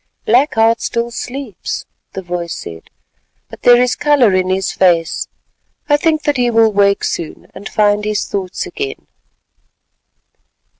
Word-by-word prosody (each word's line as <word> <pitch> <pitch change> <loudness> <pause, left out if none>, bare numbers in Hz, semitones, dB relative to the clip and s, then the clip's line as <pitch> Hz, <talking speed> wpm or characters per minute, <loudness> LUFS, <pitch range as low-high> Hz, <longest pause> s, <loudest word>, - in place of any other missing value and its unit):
"Black 255 +7 +3
Heart 225 +1 +3
still 235 0 -2
sleeps," 250 -4 -6 0.3
the 190 - -6
voice 175 -1 -4
said, 80 0 -9 0.6
"but - - -12
there 245 0 +6
is 250 0 +2
colour 280 -9 +3
in 185 0 +1
his 190 +1 0
face; 170 -3 +1 0.6
I 290 - +4
think 310 0 +1
that 290 -2 0
he 245 -1 +2
will 225 -1 +4
wake 200 0 +2
soon, 165 - -4
and 200 - -8
find 210 -1 +2
his 210 0 -1
thoughts 190 - -4
again." 410 +3 -6
220 Hz, 145 wpm, -16 LUFS, 190-250 Hz, 0.6 s, there